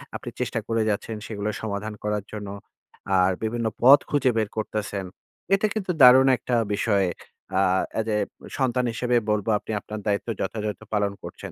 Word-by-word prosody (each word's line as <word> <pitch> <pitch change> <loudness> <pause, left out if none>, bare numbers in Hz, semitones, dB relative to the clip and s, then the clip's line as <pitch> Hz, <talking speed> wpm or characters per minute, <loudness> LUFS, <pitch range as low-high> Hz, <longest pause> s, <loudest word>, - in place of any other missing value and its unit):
আপনি - - -5
চেষ্টা - - -1
করে 115 0 +1
যাচ্ছেন 110 +2 -2
সেগুলো 105 -1 -3
সমাধান 110 0 -4
করার 105 -1 -1
জন্য। 105 -2 -5 0.7
আর 90 +1 +4
বিভিন্ন 115 +1 -1
পথ 135 +4 +9
খুঁজে 135 -3 +2
বের 110 -2 +1
করতেছেন। 105 -2 -3 0.5
এতে 195 +2 +3
কিন্তু 200 -4 -2
দারুণ 130 +1 +9
একটা 125 - -2 0.2
বিষয়। 100 -2 +2 0.5
আ - - +4 0.4
as 110 - 0
a - - +2 0.4
সন্তান 125 -2 +1
হিসেবে 125 +2 0
বলব, 105 -1 0
"আপনি - - -8
আপনার 105 +1 -7
দায়িত্ব 100 +2 0
যথাযথ 105 +1 -3 0.2
পালন 100 -1 +1
করছেন।" - - -8
110 Hz, 160 wpm, -25 LUFS, 105-125 Hz, 0.7 s, পথ